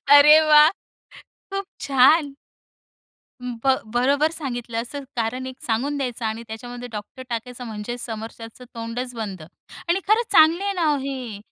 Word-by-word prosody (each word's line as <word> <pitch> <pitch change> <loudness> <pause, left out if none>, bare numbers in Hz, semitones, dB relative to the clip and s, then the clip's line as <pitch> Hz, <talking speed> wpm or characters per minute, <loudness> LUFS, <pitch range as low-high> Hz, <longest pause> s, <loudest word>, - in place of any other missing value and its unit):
अरे 295 +2 +9
वाह! 300 +1 +8 0.8
खूप 390 0 -3
छान. 275 +2 +4 1.1
अं, 250 -1 -5
ब 265 -1 +5 0.2
बरोबर 280 +6 +2
सांगितलं, 245 -7 -4
असं 280 +4 -7
कारण 245 +3 -2
एक 260 0 -7
सांगून 260 +6 -1
द्यायचं 250 -4 -3
आणि 220 +1 -2
त्याच्यामध्ये 245 +2 -7
डॉक्टर 210 +5 -8
टाकायचं 245 +2 -5
म्हणजे 220 +2 -5
समोरच्याचं 225 +1 -8
तोंडच 235 +2 -5
बंद. 200 -7 -5 0.5
आणि 360 +3 +2
खरंच 445 +3 +3
चांगली 320 +4 +6
आहे 400 - 0
ना, 355 -4 -1
ओ - - 0
हे. 260 -6 -5
250 Hz, 145 wpm, -23 LUFS, 230-290 Hz, 1.1 s, अरे